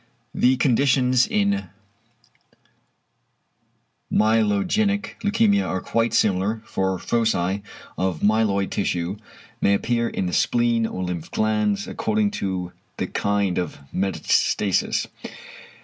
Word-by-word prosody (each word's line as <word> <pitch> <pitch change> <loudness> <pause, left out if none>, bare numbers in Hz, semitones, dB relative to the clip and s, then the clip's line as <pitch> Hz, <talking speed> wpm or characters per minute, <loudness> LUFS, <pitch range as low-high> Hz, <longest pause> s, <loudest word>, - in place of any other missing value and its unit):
The 130 +1 +3
conditions 130 -1 +3
in 205 -2 0 2.4
myelogenic 115 - +1
leukæmia 205 -1 +2
are 95 - -1
quite 115 +3 0
similar, 105 +3 +1
for 95 -1 -1
foci 100 -2 0 0.4
of 90 -3 -1
myeloid 105 -2 +2
tissue 90 -1 -2 0.4
may 100 - +4
appear 115 +2 0
in 95 - -3
the 90 - -3
spleen 120 -1 +2
or 95 - -5
lymph 90 -3 -4
glands 110 - 0
according 215 -2 0
to 95 -2 -3 0.3
the - - -1
kind 100 -3 0
of 90 -4 -4 0.2
metastasis. 95 0 +1
110 Hz, 100 wpm, -23 LUFS, 95-130 Hz, 2.4 s, may